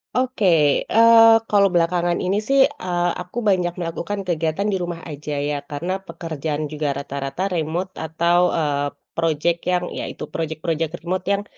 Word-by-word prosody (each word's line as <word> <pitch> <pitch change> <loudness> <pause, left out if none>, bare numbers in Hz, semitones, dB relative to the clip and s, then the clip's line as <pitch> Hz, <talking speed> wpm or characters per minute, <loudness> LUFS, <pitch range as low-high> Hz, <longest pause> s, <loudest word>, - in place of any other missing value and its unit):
Oke, 255 -4 0 0.5
eee, 225 0 +7
kalau 200 -2 +4
belakangan 175 0 +1
ini 195 +3 0
sih, 275 0 +3
eee, 180 -11 -2
aku 180 +6 -10
banyak 180 -3 +2
melakukan 175 +4 -3
kegiatan 165 +3 -1
di 205 - 0
rumah 175 -1 -4
aja 150 -1 -5
ya, 145 0 -2
karena, 175 +7 -4
pekerjaan 155 -2 -4
juga 150 -1 -2
rata-rata 140 +6 -3
remote, 170 +4 -2
atau, 170 +2 +1
eee, 145 -3 0 0.3
projek 165 +1 0
yang, 180 0 +1 0.2
ya - - -3
itu, - - -8
projek-projek 160 +1 -3
remote 180 +2 -3
yang, 200 0 +1
170 Hz, 150 wpm, -21 LUFS, 155-185 Hz, 0.5 s, eee